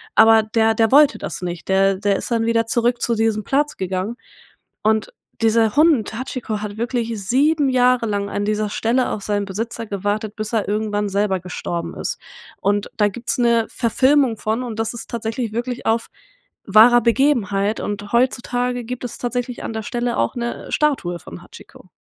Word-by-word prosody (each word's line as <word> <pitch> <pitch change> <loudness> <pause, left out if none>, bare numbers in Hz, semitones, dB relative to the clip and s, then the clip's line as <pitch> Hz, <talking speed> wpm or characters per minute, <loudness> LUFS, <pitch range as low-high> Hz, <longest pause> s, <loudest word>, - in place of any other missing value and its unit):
Aber 220 0 +7
der 220 +1 +2
der 225 +1 +2
wollte 295 +1 +6
das - - -5
nicht. 175 -1 -5
Der 195 0 +3
der 200 0 +1
ist - - -6
dann 225 -1 +1
wieder 230 -1 +2
zurück 240 +1 +1
zu 235 - +1
diesem 220 -1 0
Platz 290 +4 0
gegangen 190 +5 -3 0.7
und 220 0 +1 0.3
dieser 225 0 +3
Hund 295 -9 +3
Hachiko 235 -4 -4
hat 210 0 -6
wirklich 235 0 -2 0.2
7 290 +2 +3
Jahre 250 -2 +3
lang 200 -1 -1
an 205 - -2
dieser 215 0 -1
Stelle 245 +3 +1
auf 205 - -4
seinen 205 -1 -1
Besitzer 225 +3 -4
gewartet, 205 +2 -3
bis 215 +1 -5
er 220 - 0
irgendwann 210 -1 -1
selber 195 -1 0
gestorben 170 -1 -5
ist. - - -4 0.4
Und 205 +1 0
da 210 -1 +4
gibt's 235 +5 -3
'ne 235 -2 +3
Verfilmung 260 0 +2
von, 220 +4 -2
und 225 -2 -6
das 225 +1 -1
ist - - -8
tatsächlich 225 0 -3
wirklich 240 +1 -4
auf 225 +1 +1 0.6
wahrer 235 +4 +7
Begebenheit, 220 -5 +1
und 205 0 -5
heutzutage 245 0 0
gibt 250 +1 -6
es 240 - -6
tatsächlich 245 0 -3
an - - -4
der 220 -1 -4
Stelle 240 +1 -2
auch 115 - 0
'ne 240 0 -4
Statue 260 - 0
von 85 - -11
Hachiko. - - -16
225 Hz, 175 wpm, -20 LUFS, 205-245 Hz, 0.7 s, Aber